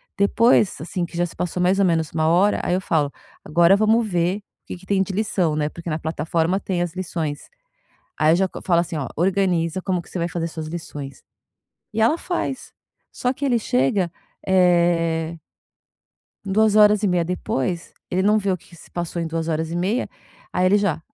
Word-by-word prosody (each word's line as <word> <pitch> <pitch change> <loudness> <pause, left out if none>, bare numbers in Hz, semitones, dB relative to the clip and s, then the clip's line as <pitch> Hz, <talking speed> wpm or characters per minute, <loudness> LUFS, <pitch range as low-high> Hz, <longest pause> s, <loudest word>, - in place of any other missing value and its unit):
Depois, 210 0 +3
assim, 175 +3 -3
que 170 0 -6
já 175 - +2
se 170 - -9
passou 180 0 -2
mais 190 +2 +3
ou 195 - +4
menos 165 -3 +1
uma 155 -1 0
hora 185 +5 +3
aí 180 - +1
eu 185 - -1
falo: 150 -6 0 0.3
"Agora 170 +4 +4
vamos 220 +2 +3
ver 175 +1 0
o 205 - -14 0.2
que - - -6
que 185 - -17
tem 195 0 +1
de 195 - -1
lição." 185 -6 0
Né 150 -1 0
porque 170 +2 -7
na 155 - -1
plataforma 165 +3 -1
tem 180 -3 -1
as 170 - -4
lições. 165 -5 -4 0.7
Aí 155 +1 +4
eu - - +4
já 190 +1 +2
c - - -13
falo 170 -3 +3
assim 170 -2 -4
ó: 135 -5 -3
"Organiza 180 -1 +1
como 180 -3 -1
que - - -19
você 185 - -5
vai 170 +1 -1
fazer 165 -1 -3
suas 160 -1 -6
lições." 145 -4 -7 0.7
E 220 - 0
ela 235 +9 +4
faz, 335 -8 -4 0.4
só 250 - -1
que 285 - -4
ele 240 -3 +2
chega, 170 +4 +1 0.4
eh 170 -3 +2 1.1
2:30 210 -3 +4
depois, 175 -1 -3 0.2
ele 185 +1 +1
não 210 +2 +4
vê 200 -2 -1
o 185 - +1
que - - -21
que 170 - -14
se - - -16
passou 175 0 -4
em 165 - -2
2:30, 165 +6 -1 0.4
aí 180 - +1
ele 200 +3 +4
já 180 -6 0
175 Hz, 195 wpm, -22 LUFS, 165-195 Hz, 1.1 s, ou